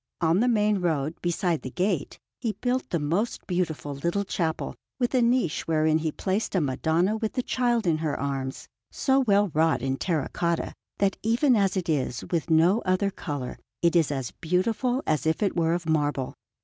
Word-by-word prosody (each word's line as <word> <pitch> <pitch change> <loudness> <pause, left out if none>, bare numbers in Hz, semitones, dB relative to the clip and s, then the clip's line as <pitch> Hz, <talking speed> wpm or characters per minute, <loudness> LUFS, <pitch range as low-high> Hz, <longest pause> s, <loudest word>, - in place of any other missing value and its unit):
On 170 +1 +3
the 245 - +3
main 210 -3 +2
road, 160 -4 0
beside 175 -1 0
the 130 - -5
gate, 180 +1 -1 0.2
he 230 -4 -1
built 250 +5 -2
a 170 - +2
most 170 +10 -1
beautiful 165 -5 -2
little 170 +8 -1
chapel, 165 -4 -2 0.3
with 245 0 0
a 255 - +4
niche 235 -8 +1
wherein 155 -1 +3
he 160 -1 -1
placed 195 +6 -2
a - - +4
Madonna 160 +8 +1
with 220 -1 -2
the 250 - -1
Child 240 -3 +1
in 160 -3 +2
her 155 -2 -2
arms, 135 -1 -3 0.2
so 270 -1 +2
well 205 -5 +3
wrought 160 -5 +2
in 135 0 0
terra 160 -3 -1
cotta, 170 -1 -1 0.2
that 195 -1 +1
even 240 +4 +3
as 195 -2 +2
it 185 -1 -2
is, 135 -6 -1
with 170 0 -1
no 170 +7 +4
other 185 +2 +1
colour, 145 -8 -5 0.2
it 170 0 +3
is 165 -4 +3
as 135 -4 -3
beautiful 220 - 0
as 155 0 0
if 160 +6 +1
it 200 - 0
were 165 -1 +2
of 175 -2 -5
marble. 145 -4 0
175 Hz, 190 wpm, -26 LUFS, 155-210 Hz, 0.3 s, a